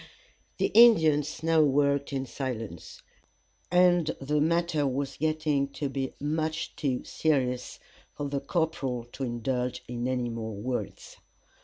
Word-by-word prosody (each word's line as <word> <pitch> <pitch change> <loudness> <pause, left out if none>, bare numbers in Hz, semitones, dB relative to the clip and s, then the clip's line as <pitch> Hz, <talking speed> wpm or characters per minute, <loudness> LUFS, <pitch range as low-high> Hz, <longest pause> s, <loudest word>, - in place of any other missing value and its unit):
The - - 0
Indians 160 -11 +5
now 165 -1 +4
worked 140 -1 +2
in 135 -1 -2
silence, 115 - -6 0.7
and 175 -2 +4
the 150 +2 0
matter 165 -2 +1
was 135 +1 -2
getting 155 -2 0
to 145 - -3
be 135 -1 -3
much 155 +2 -2
too 130 -4 -1
serious 130 -5 -1 0.4
for 145 - -3
the 140 0 -2
corporal 140 -6 -1
to 135 - -6
indulge 125 +1 -2
in 120 0 -3
any 125 -2 -1
more 110 -2 -5
words. 125 +5 -5
140 Hz, 130 wpm, -28 LUFS, 125-155 Hz, 0.7 s, Indians